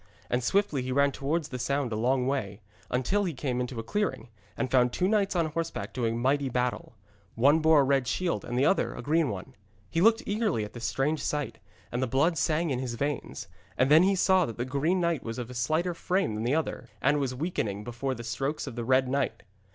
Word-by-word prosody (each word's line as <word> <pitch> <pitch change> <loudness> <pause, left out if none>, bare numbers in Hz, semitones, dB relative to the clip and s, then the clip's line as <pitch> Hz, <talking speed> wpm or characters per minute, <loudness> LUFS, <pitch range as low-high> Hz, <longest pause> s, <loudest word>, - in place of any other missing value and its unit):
And 125 0 +1
swiftly 175 -1 +1
he 130 +1 -4
ran 140 +2 +3
towards 145 +4 -2
the 125 - -5
sound 140 0 -1
a - - -1
long 125 +3 +1
way, 110 -7 -2 0.3
until 190 +12 +1
he 170 -5 -3
came 125 -2 -2
into 125 -1 -4
a - - -4
clearing, 130 - -2 0.3
and 130 - -2
found 125 -2 +4
two 180 - 0
knights 200 -2 +1
on 170 -2 +2
horseback 165 +1 -4
doing 115 -2 -1
mighty 135 +2 +1
battle. 125 -1 -2 0.4
One 140 +7 +5
bore 160 -2 +5
a - - +3
red 135 -1 +2
shield 170 +9 -1
and 120 - -4
the 135 - +3
other 195 - +2
a - - -7
green 155 0 +2
one. 95 -3 -6 0.4
He 165 - +1
looked 225 +3 +4
eagerly 205 - 0
at 105 - -11
this 120 -1 -6
strange 135 +8 0
sight, 145 -2 -3 0.3
and 120 - -2
the 130 - +1
blood 140 +8 +2
sang 160 0 +1
in 125 - -1
his 125 -2 -3
veins. 140 +3 -3 0.3
And 130 +3 +3
then 155 +2 +8
he 195 +2 +3
saw 185 -1 +3
that 115 - -7
the 120 - -2
green 145 +8 0
knight 170 -4 +1
was 115 +1 -5
of 125 0 -6
slighter 155 +9 0
frame 180 - 0
than 110 +2 -3
the 130 +5 +2
other, 155 -7 -3
and 145 +2 +2
was 130 -2 -1
weakening 115 - -2
before 125 +3 -3
the 120 - -8
strokes 135 +6 -2
of 135 -5 -7
the 120 - -3
red 130 +2 +3
knight. 140 +2 -1
135 Hz, 230 wpm, -28 LUFS, 125-160 Hz, 0.4 s, then